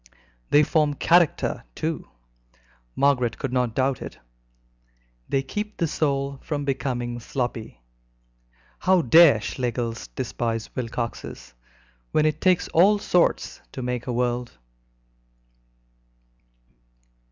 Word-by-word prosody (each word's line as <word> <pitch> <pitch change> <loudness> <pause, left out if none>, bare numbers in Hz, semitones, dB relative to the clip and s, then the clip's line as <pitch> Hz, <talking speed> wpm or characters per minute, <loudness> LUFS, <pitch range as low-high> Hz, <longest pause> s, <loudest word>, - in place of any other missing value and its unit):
They 150 - +6
form 150 -1 +2
character, 170 +1 +2
too; 160 0 -3 0.9
Margaret 125 -4 +2
could 130 -2 -4
not 125 -3 0
doubt 130 -1 0
it: - - -8 1.1
they 135 0 +1
keep 210 +9 -5
the 170 - +1
soul 140 -3 -1
from 145 -2 -3
becoming 120 -3 -2
sloppy. 115 - -4 1.0
How 185 -2 +3
dare 150 -2 +7
Schlegels 115 - -3
despise 115 -1 -3
Wilcoxes, 115 - -5 0.6
when 155 - +3
it 155 - 0
takes 185 -1 +3
all 195 +5 +5
sorts 180 -3 +1
to 130 - -5
make 125 0 -3
a - - -1
world? 120 0 -1
135 Hz, 105 wpm, -24 LUFS, 120-155 Hz, 1.1 s, dare